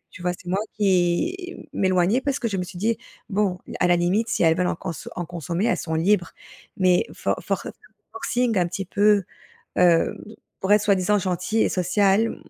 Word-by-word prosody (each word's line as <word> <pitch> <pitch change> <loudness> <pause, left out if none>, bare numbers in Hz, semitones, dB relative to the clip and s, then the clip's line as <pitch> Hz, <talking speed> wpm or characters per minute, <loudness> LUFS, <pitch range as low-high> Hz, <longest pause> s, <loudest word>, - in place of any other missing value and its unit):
tu 180 - -12
vois? 180 - 0
C'est 180 - -13
moi 185 - 0 0.2
qui 205 - +1 0.2
m'éloignais 190 +6 +2
parce 280 -1 -1
que 230 - -1
je 195 - -2
me 180 - -1
suis 180 0 -9
dit: 225 +3 +1 0.3
«Bon, 195 -2 0 0.2
à 180 - +4
la 175 - +5
limite, 190 +7 +1
si - - 0
elles 160 0 +4
veulent 180 - +1
en - - -1
conso 170 -2 -6
en 175 - -3
consommer, 170 +4 -2
elles 235 - +2
sont 160 - -5
libres, 175 +2 +1 0.5
mais 185 -1 +4
for - - -1
for - - -2 0.5
forcing 245 - -1
un 175 - +2
petit 195 +1 -5
peu, 205 0 +3 0.5
hem, 175 -2 +4 0.4
pour 190 - -2
être 210 - +5
soi-disant 200 0 +2
gentilles 185 +4 0
et - - +2
sociales», 195 +4 +2
190 Hz, 190 wpm, -23 LUFS, 175-210 Hz, 0.5 s, la